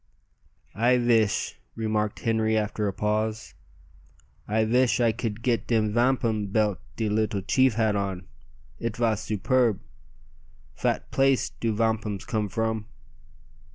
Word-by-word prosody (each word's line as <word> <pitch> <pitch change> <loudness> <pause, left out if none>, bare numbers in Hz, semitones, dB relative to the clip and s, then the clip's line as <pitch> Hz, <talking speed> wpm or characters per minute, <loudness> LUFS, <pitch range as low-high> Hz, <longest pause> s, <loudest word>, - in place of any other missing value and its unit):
"I 120 +4 +3
vish," 115 -5 +1 0.2
remarked 110 -1 -1
Henri 110 -1 +1
after 105 0 -1
a - - 0
pause 110 +2 -2 0.9
"I 110 +1 +1
vish 125 +3 +2
I 120 -2 +4
could 110 0 -4
git 120 -2 0
de 115 -2 +3
vampum 115 -1 +1
belt 105 -1 +1 0.2
de 110 - -1
leetle 105 -1 0
chief 130 +2 +3
had 110 -2 +2
on. 95 -2 -3 0.5
It 115 -1 -3
vas 110 -2 +1
superb. 115 +1 +1 0.9
Fat - - -2
place 135 -1 +2
do 115 - -2
vampums 110 -2 -1
come 105 -3 -1
from?" 110 +1 -2
110 Hz, 125 wpm, -26 LUFS, 105-115 Hz, 0.9 s, I